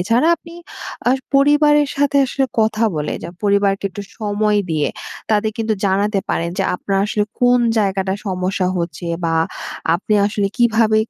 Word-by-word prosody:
এছাড়া 235 - +2
আপনি 335 +2 -14 0.5
আ - - +5 0.2
পরিবারের 295 +1 +4
সাথে 285 0 +1
আসলে 270 +1 0 0.2
কথা 220 +1 +1
বলে, 150 - -2
যে 165 - -6 0.2
পরিবারকে 200 -1 +2
একটু 205 - -7 0.2
সময় 210 0 +1
দিয়ে 150 -2 +1 0.4
তাদের 215 +1 +1
কিন্তু 220 -1 0
জানাতে 200 +1 +1
পারেন, 170 +1 -1
যে - - +1
আপনার 195 +1 -1
আসলে 210 0 0 0.2
কোন 245 0 +4 0.2
জায়গাটা 195 -2 0
সমস্যা 185 0 -1
হচ্ছে, 170 0 -4 0.2
বা 165 0 +1 0.6
আপনি 205 +4 -1
আসলে 205 -1 -1
কিভাবে 225 -2 +3
210 Hz, 150 wpm, -19 LUFS, 190-235 Hz, 0.6 s, আ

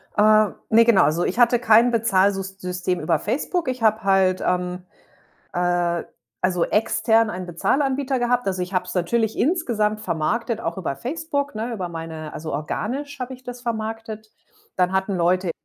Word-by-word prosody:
Äh, 215 0 +5 0.2
ne, 230 +1 +6
genau. 225 -8 +5
Also, 155 +4 +1
ich 195 - -2
hatte 240 0 +5
kein 230 +1 +5
Bezahlsus 195 -4 +1
System 180 0 -2
über 160 +2 +1
Facebook. 330 +4 -2
Ich 255 -2 -3
habe 220 0 +3
halt, 190 -1 +3
ähm, 180 0 -1 0.7
äh, 175 -1 0 0.4
also 180 -2 +1
extern 225 +1 +2
einen 185 -2 -5
Bezahlanbieter 265 - 0
gehabt. 245 0 +1
Also, 185 -2 -1
ich 180 +2 -6
habe 180 0 +1
es 180 - -7
natürlich 220 +5 0
insgesamt 230 - 0
vermarktet, 225 +5 -1
auch - - -3
über 155 -7 -3
Facebook, 285 - -3
ne, 225 +3 -3
über 190 -6 -4
meine 160 -2 -7
also 155 +1 -6
organisch 265 - -4
habe 255 +1 -4
ich 255 - -16
das 245 0 -7
vermarktet. 220 -1 -5 0.5
Dann 180 0 +2
hatten 190 0 0
Leute, 180 +1 +1
215 Hz, 165 wpm, -22 LUFS, 180-235 Hz, 0.7 s, ne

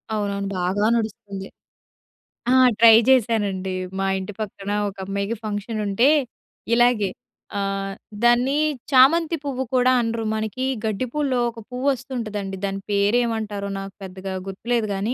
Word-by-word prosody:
అవునవును. 200 -1 -2
బాగా 190 +4 0
నడుస్తుంది. 210 -3 -4 1.0
ఆ! - - +5 0.3
ట్రై 230 -1 +9
జేశానండి. 205 -7 +2 0.3
మా 195 - 0
ఇంటి 190 +2 -6
పక్కన 200 -1 -5 0.2
ఒక 200 - -7
అమ్మాయికి 200 +3 -2
ఫంక్షనుంటే 210 +2 0 0.7
ఇలాగే 240 -4 +3 0.5
ఆహ్, 195 0 -2 0.3
దాన్ని 245 +4 +4 0.3
చామంతి 320 +6 +5
పువ్వు 265 -2 -2
కూడా 255 0 +4
అనరు. 230 0 -2
మనకి 220 +4 -2 0.2
గడ్డిపూల్లో 255 +5 -1
ఒక 230 - -10
పువ్వొస్తుంటుందండి, 245 -7 -2
దాని 195 0 -2
పేరేమంటారో 210 -1 0
నాకు 195 0 -7
పెద్దగా 190 0 -6
గుర్తులేదు 225 +4 -1
గానీ 200 +5 -1
215 Hz, 115 wpm, -23 LUFS, 200-245 Hz, 1.0 s, ట్రై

